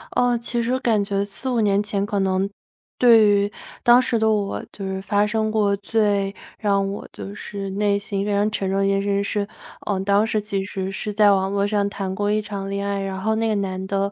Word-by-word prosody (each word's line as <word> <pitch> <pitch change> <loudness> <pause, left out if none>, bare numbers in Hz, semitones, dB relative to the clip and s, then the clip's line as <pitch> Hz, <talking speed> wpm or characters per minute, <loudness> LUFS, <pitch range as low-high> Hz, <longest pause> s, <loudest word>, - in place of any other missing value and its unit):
呃， 245 -1 +3
其 235 0 -2
实 255 +2 0
感 220 -5 +2
觉 200 0 -1
4-5 240 +4 -3
年 200 -1 +3
前， 200 -1 -1
可 205 -1 -1
能 190 +1 +1 0.5
对 230 -3 +6
于 205 0 +2 0.3
当 240 0 +7
时 240 -2 +1
的 220 0 +2
我 205 -2 -1
就 195 - -7
是 190 0 -3
发 205 +1 +1
生 220 0 0
过 205 -2 +2
最 205 -1 0 0.3
让 200 -2 +1
我 200 - -7
就 200 - -8
是 200 -2 -6
内 200 0 +1
心 200 -1 -3
非 210 - -1
常 205 +1 +2
沉 195 -3 -2
重 195 - 0
的 195 - +2
一 195 - +2
件 195 0 +1
事 200 - -4
情 200 0 +1
是 205 0 -1 0.4
呃， 195 -2 0
当 200 +2 +3
时 215 -1 0
其 200 -2 -2
实 190 -1 -4
是 205 +2 -4
在 205 -1 +5
网 190 0 +1
络 200 0 +1
上 205 -1 +1
谈 195 -2 -4
过 205 0 0
一 215 - +1
场 200 -2 -5
恋 200 0 -2
爱， 200 0 -1
然 190 -1 -4
后 220 +2 +1
那 225 +1 0
个 215 - +1
男 190 -1 -2
的， 200 0 0
200 Hz, 250 characters per minute, -22 LUFS, 195-215 Hz, 0.5 s, 当